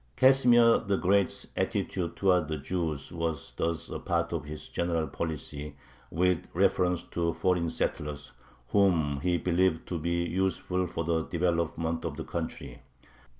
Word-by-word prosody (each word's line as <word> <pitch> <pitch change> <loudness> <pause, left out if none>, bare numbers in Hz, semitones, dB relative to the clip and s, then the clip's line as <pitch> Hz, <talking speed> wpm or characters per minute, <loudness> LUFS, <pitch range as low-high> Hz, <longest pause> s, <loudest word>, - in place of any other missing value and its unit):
Casimir 120 -3 +6
the 100 -3 0
Great's 100 +1 +2
attitude 85 -3 -1
towards 90 -5 +3
the 80 - -1
Jews 75 -2 -3
was 80 -3 -3
thus 85 -1 -2
a - - -5
part - - -1
of - - -3
his 75 +1 -7
general 85 -2 -1
policy 75 -1 -5 0.3
with 90 +1 +1
reference 90 -1 +2
to 85 -1 -2
foreign 90 -2 +1
settlers, 75 -3 -3 0.4
whom 85 -8 +3
he 90 +2 +2
believed 85 0 +1
to 85 - -2
be 85 +2 0
useful 90 0 -1
for 85 - -3
the 80 -1 0
development 85 -1 -1
of 75 -3 -4
the 80 - -4
country. 80 -6 -5
85 Hz, 145 wpm, -29 LUFS, 80-90 Hz, 0.4 s, Casimir